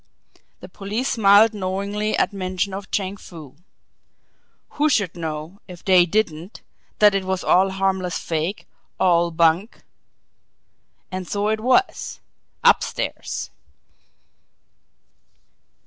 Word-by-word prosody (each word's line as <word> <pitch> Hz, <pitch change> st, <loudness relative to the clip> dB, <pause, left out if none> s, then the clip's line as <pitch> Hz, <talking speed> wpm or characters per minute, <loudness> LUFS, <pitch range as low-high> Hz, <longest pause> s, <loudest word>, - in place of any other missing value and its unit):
The -, -, -9 dB
police 215 Hz, +7 st, -4 dB
smiled 215 Hz, -1 st, +5 dB
knowingly 200 Hz, +2 st, -2 dB
at -, -, +1 dB
mention 185 Hz, 0 st, -3 dB
of 195 Hz, 0 st, -7 dB
Chang 195 Hz, 0 st, -2 dB
Foo. 155 Hz, -8 st, -12 dB, 1.1 s
Who 300 Hz, +1 st, +1 dB
should 200 Hz, -, 0 dB
know, 160 Hz, +2 st, -6 dB
if 180 Hz, -2 st, -12 dB
they 180 Hz, -2 st, +5 dB
didn't, 180 Hz, -2 st, -2 dB, 0.3 s
that 210 Hz, -1 st, +5 dB
it 195 Hz, -1 st, 0 dB
was 190 Hz, 0 st, -2 dB
all 190 Hz, +2 st, +4 dB
harmless 190 Hz, -2 st, -1 dB
fake, 165 Hz, +5 st, -3 dB, 0.3 s
all 170 Hz, -2 st, +3 dB
bunk! 170 Hz, +5 st, +1 dB, 1.3 s
And 185 Hz, -1 st, -5 dB
so 205 Hz, +1 st, -1 dB
it 220 Hz, 0 st, 0 dB
was 260 Hz, -, 0 dB, 0.4 s
UPSTAIRS! -, -, 0 dB
190 Hz, 105 wpm, -22 LUFS, 175-205 Hz, 1.3 s, smiled